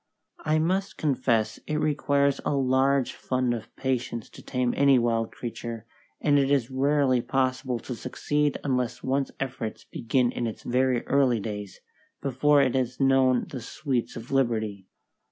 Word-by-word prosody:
I 155 +1 +2
must 190 +5 0
confess 120 -6 +1
it 155 - -1
requires 140 -2 +1
a - - 0
large 135 0 +2
fund 130 -1 -1
of 115 -2 -7
patience 125 -4 -2
to - - -12
tame 125 -2 -1
any 140 -1 +5
wild 115 -2 +1
creature, 115 -1 -6 0.3
and 145 -1 +3
it 135 -1 +2
is 135 -3 +1
rarely 135 -1 +2
possible 130 0 0
to 125 - -5
succeed 145 +4 -1
unless 125 -4 -1
one's 135 +1 0
efforts 125 -4 -4
begin 120 +1 0
in 120 - -2
its 110 - -7
very 125 0 +1
early 130 -4 +3
days, 105 -2 -6 0.4
before 140 +2 +3
it 130 - +1
has 125 -2 -1
known 135 -2 +3
the 130 - -5
sweets 125 +1 -3
of 115 +1 -8
liberty. 110 -7 0
130 Hz, 155 wpm, -26 LUFS, 120-140 Hz, 0.4 s, any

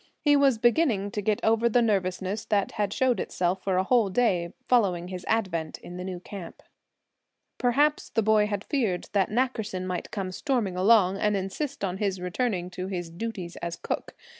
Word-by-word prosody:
He 290 -1 +4
was 275 -4 +4
beginning 235 -4 +2
to 210 - -2
get 210 +1 +1
over 225 +1 +3
the 245 - +4
nervousness 195 -1 0
that 205 -3 +1
had 205 -2 -1
shown 255 +2 +1
itself 180 +1 -1
for 190 -2 +1
a 185 - +3
whole 230 0 +3
day 185 -6 +1 0.2
following 185 -8 +2
his 180 -1 -6
advent 180 -8 -1
in 180 - -10
the 180 - -5
new 185 -1 -5
camp. 185 -1 -9 1.0
Perhaps 290 +5 +2
the 225 - 0
boy 215 0 +4
had 205 -1 -3
feared 225 - -1
that 195 -2 +2
Nackerson 220 -6 -1
might 180 -1 -4
come 195 -3 -4
storming 225 -3 -1
along, 195 0 +4
and 210 -1 +2
insist 225 +10 -4
on 190 -1 -1
his 195 -3 -1
returning 180 0 -2
to 185 0 -5
his 175 -3 -4
duties 185 -2 -5
as 170 0 -4
cook. - - -4
200 Hz, 185 wpm, -27 LUFS, 185-230 Hz, 1.0 s, He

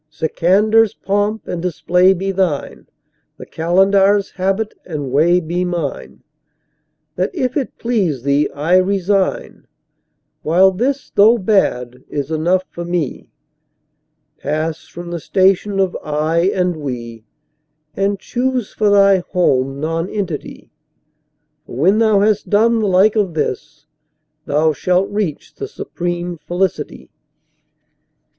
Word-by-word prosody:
Sikandar's3 195 +8 +2
pomp 205 +2 -1
and 175 - -4
display 180 +1 +2
be 195 +1 -1
thine, 180 -7 -2 0.5
the - - -10
Qalandar's4 195 +4 +2
habit 195 +3 -1
and 145 -6 -5
way 165 +6 +4
be 175 +2 -2
mine; 175 -5 -4 0.9
That, - - 0
if 255 -6 -1
it 275 -4 -3
please 190 - -1
thee, 140 +1 +1
I 160 +6 +2
resign, 195 +1 0 0.7
while 185 +5 +4
this, 260 +8 -2
though 220 +4 +5
bad, 155 - 0
is 145 +1 -4
enough 175 +4 +1
for 175 - -6
me. 170 -5 -3 1.1
Pass 155 +2 -3
from 175 0 -9
the 170 - -3
station 195 +3 +1
of 190 -2 +1
"I" 155 +4 0
and 180 -2 -1
"We," 120 -6 -6 0.7
and 200 +1 0
choose 250 +2 -2
for 210 -1 +1
thy 200 -1 +5
home 135 -7 0
Nonentity, 165 +2 -4 1.0
For - - -9
when 185 - +3
thou 215 -3 +3
has 210 0 +2
done 225 +2 +2
the 215 - 0
like 195 +3 +4
of 195 -6 0
this, 150 0 -4 0.6
thou 155 +2 +2
shalt 180 +5 0
reach 205 -8 -3
the - - -6
supreme 175 -1 -5
Felicity. 175 - -3
180 Hz, 120 wpm, -17 LUFS, 160-200 Hz, 1.1 s, though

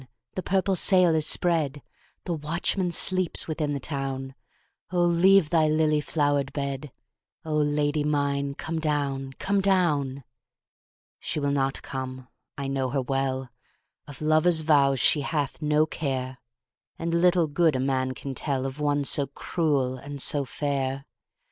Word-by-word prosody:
the 185 - -3
purple 190 +1 0
sail 180 -1 +4
is 155 -1 +2
spread, 155 -5 +2 0.4
The 175 - -3
watchman 170 +4 -1
sleeps 185 0 +2
within 155 -2 -2
the - - -3
town,O 135 +5 -6
leave 175 0 +4
thy 160 -2 +3
lily 155 -1 +2
flowered 145 -2 0
bed,O 140 +1 -7
Lady 150 0 +1
mine 140 -1 -1
come 160 +2 -4
down, 140 -3 -2
come 200 +8 -1
down! 150 -9 +1 1.0
She - - -3
will 145 -1 0
not 135 -1 -1
come, 130 -1 -6 0.3
I 140 -1 -4
know 135 -1 -1
her 135 +1 -1
well, 135 -1 -2 0.6
Of 145 0 -10
lover's 155 +2 +3
vows 140 -4 +3
she 145 - +4
hath 145 0 -3
no 150 0 +2
care, 130 -4 -4 0.6
And 165 0 -3
little 175 0 +3
good 155 0 +1
a - - 0
man 130 -1 0
can 135 +1 -6
tellOf 135 0 -3
one 145 -1 +1
so 140 0 +3
cruel 140 -3 -1
and 140 +2 -8
so 140 +1 +3
fair. 135 -1 -3
145 Hz, 140 wpm, -26 LUFS, 135-160 Hz, 1.0 s, sail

